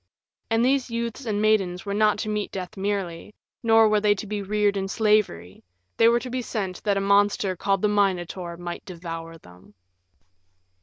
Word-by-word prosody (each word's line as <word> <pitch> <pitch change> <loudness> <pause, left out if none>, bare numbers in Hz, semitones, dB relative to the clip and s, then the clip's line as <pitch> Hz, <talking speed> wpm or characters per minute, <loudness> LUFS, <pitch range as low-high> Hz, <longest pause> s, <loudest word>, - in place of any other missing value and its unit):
And 225 +1 +2
these 265 -1 +1
youths 235 +2 -4
and 205 -2 0
maidens 195 -5 +1
were 200 - -3
not 210 0 +3
to 215 - -4
meet 210 -1 -2
death 185 +2 -6
merely, 195 -2 -3 0.3
nor 225 -1 +5
were 210 -1 +2
they 205 -1 +3
to 205 - -6
be 210 0 -3
reared 205 0 +1
in 195 -1 -2
slavery 210 - 0 0.3
they 225 - +6
were 235 +1 +4
to 255 - -6
be 255 0 -2
sent 195 -6 -4
that 200 -1 +2
a - - +2
monster 200 -1 +2
called 195 +2 0
the - - +5
Minotaur 185 -4 -1
might 175 0 -6
devour 165 -2 -7
them. 90 - -18
205 Hz, 185 wpm, -24 LUFS, 180-215 Hz, 0.3 s, they